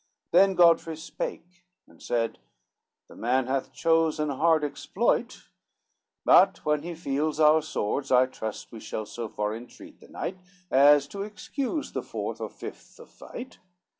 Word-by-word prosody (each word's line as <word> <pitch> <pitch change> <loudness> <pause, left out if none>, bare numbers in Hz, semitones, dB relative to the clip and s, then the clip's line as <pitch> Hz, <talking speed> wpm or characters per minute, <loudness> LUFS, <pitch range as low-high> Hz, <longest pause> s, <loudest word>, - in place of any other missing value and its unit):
Then 195 -1 +5
Godfrey 165 -2 +4
spake, 175 +2 -7 0.2
and - - -21
said, 115 -1 -1 0.7
"The - - -15
man 125 +2 +1
hath 130 +1 -2
chose 165 -1 +2
An 150 0 0
hard 160 +2 +3
exploit, 145 - -1 0.8
but - - +5
when 150 -1 +1
he 170 +2 -6
feels 155 0 -2
our 155 0 +6
swords, 140 -3 -3
I 130 0 +6
trust 110 -4 -7
we 115 - -9
shall 110 0 -5
so 115 +1 -6
far 105 +1 -2
entreat 120 +2 -12
the - - -16
knight, 185 +1 -5 0.3
As 140 +1 +6
to 200 - -6
excuse 255 +8 -4
the - - -3
fourth - - -5
or - - -3
fifth - - -11
of - - -14
fight. 255 +2 -10
150 Hz, 155 wpm, -27 LUFS, 130-170 Hz, 0.8 s, our